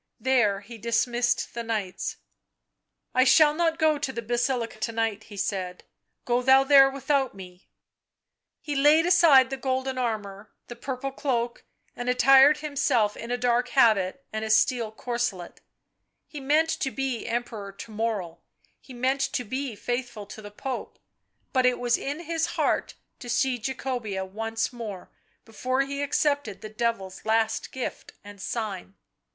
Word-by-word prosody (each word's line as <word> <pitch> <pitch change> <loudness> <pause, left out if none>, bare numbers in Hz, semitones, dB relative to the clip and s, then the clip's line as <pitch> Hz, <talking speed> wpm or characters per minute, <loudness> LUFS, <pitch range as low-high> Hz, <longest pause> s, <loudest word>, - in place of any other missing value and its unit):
There 225 -7 +2
he 225 +2 -11
dismissed 235 +2 0
the 235 - -4
knights. 215 -5 -3 0.5
" - - -55
I 255 - +5
shall 295 +3 +6
not 325 0 +1
go 310 -2 +2
to 265 - -2
the 235 -2 -5
Basilica 240 0 -1
to 230 - -2
night," 225 -2 -2
he 205 - -12
said, 185 -2 -3 0.2
" - - -52
go 245 -1 +1
thou 265 +1 +6
there 270 -1 +7
without 275 -2 0
me." 180 -1 -13 0.9
He 295 -2 -4
laid 300 +4 +5
aside 315 -8 +6
the 270 - -2
golden 260 0 -2
armour, 210 -4 -4 0.2
the 240 - -7
purple 260 +2 -4
cloak, 245 -4 -2 0.3
and 245 0 -3
attired 270 +4 +6
himself 255 -8 +1
in 230 - -8
a 245 - 0
dark 245 0 +1
habit 225 -2 +3
and 220 0 -3
a 220 - -3
steel 220 +1 +2
corselet; 230 -6 -4 0.7
he 300 - -8
meant 305 +4 +2
to 270 - 0
be 265 -3 -3
Emperor 225 -4 -4
to 195 +3 -11
morrow, 210 -6 -3 0.4
he 260 - -13
meant 260 +3 0
to 250 - -1
be 255 +1 -4
faithful 240 -2 -4
to 210 +2 -10
the 205 - -9
Pope, 250 +5 -6 0.6
but 255 -2 +4
it 250 - +2
was 245 -1 +1
in 290 +4 -4
his 330 0 -1
heart - - 0 0.2
to 245 - -9
see 245 +1 +1
Jacobea 240 -5 -3
once 225 +5 -3
more 215 -6 -7 0.3
before 255 +4 -1
he 280 +1 -3
accepted 285 -6 0
the 215 - -7
Devil's 215 -4 -3
last 225 0 0
gift 260 - -6
and 205 -1 -12
sign. 200 -4 -4
240 Hz, 160 wpm, -26 LUFS, 220-270 Hz, 0.9 s, there